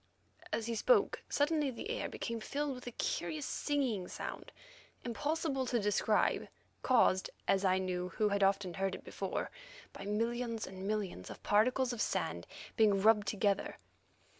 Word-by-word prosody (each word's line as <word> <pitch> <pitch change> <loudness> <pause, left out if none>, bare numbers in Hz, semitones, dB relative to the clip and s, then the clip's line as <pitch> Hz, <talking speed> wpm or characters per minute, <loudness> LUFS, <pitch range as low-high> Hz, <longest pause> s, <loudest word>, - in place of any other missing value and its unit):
As 225 - -1
he 235 - -2
spoke, 420 - +3
suddenly 295 0 +2
the 260 - -5
air - - -2
became 230 0 -4
filled 285 +5 -2
with 250 -1 -9
a - - -3
curious 160 -8 -2
singing 255 -11 -1
sound - - -6 0.5
impossible 275 +2 -1
to 240 -1 +1
describe, 210 +1 +2 0.3
caused 195 -7 +4 0.2
as 195 0 +3
I 185 -1 +4
knew, 180 -1 -2
who 210 +2 +1
had 200 0 0
often 195 -2 +2
heard 190 +2 -1
it - - -10
before, - - -3 0.4
by - - -8
millions 230 +2 -1
and 190 +1 -7
millions 200 - -2
of - - -10
particles 250 +4 +3
of 235 - -3
sand - - -1 0.3
being 210 -4 +4
rubbed 210 0 +5
together. 200 -1 0
220 Hz, 155 wpm, -34 LUFS, 195-255 Hz, 0.5 s, rubbed